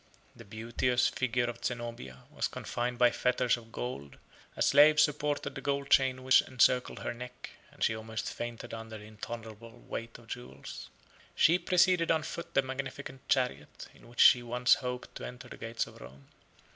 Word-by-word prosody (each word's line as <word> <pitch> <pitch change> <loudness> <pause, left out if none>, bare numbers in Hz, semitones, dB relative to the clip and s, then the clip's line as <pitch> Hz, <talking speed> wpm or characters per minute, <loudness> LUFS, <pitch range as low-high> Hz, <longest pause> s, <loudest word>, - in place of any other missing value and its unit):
The - - -12
beauteous 120 +3 0
figure 125 -1 0
of 120 -1 -6
Zenobia 120 - -5
was - - -1
confined 120 +1 -3
by 120 -1 +5
fetters 125 -1 +2
of 115 -2 -13
gold; 70 - -6 0.4
a - - +2
slave 150 +1 +6
supported 150 -1 +1
the 135 - -7
gold 140 0 -2
chain 130 -1 +4
which 130 +1 +6
encircled 125 0 +2
her - - -2
neck, 125 +1 -9 0.2
and - - -6
she 115 - +2
almost 110 0 -5
fainted 120 -1 -6
under 115 -1 -7
the 105 - -12
intolerable 115 +1 -9
weight 115 0 -6
of 120 - -17
jewels. 110 - -8 0.5
She 165 +4 +5
preceded 180 -1 +3
on 160 -2 +2
foot 170 - -7
the 135 - +4
magnificent 130 0 -6
chariot, 100 - -1
in - - -18
which 120 0 -1
she 125 - +8
once 125 +1 +3
hoped 125 -1 -3
to - - -9
enter 125 +1 -8
the - - -10
gates 115 0 -3
of - - -14
Rome. 65 +3 -13
125 Hz, 175 wpm, -31 LUFS, 115-130 Hz, 0.5 s, she